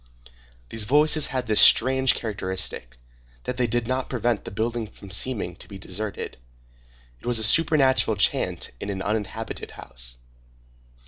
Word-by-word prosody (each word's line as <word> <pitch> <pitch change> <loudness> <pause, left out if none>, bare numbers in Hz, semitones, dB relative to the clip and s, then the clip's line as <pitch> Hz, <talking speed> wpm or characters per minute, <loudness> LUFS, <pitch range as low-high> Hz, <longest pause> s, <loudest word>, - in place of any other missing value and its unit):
These 110 -2 -1
voices 150 +4 +3
had 130 -1 -3
this 110 -2 +5
strange 130 +2 +6
characteristic, 95 - -3 0.5
that 125 - -4
they 125 -1 +1
did 120 0 -1
not 130 +1 -2
prevent 120 -3 -1
the - - -5
building 115 +2 -3
from 100 -1 -14
seeming 100 -4 +1
to - - -11
be 100 - -10
deserted. 100 +2 -5 0.8
It - - -11
was 120 -1 +1
a 110 - +2
supernatural 135 -4 +3
chant 100 - 0
in 100 - -6
an 95 -1 -4
uninhabited 105 -2 -4
house. - - -6
110 Hz, 145 wpm, -24 LUFS, 100-130 Hz, 0.8 s, strange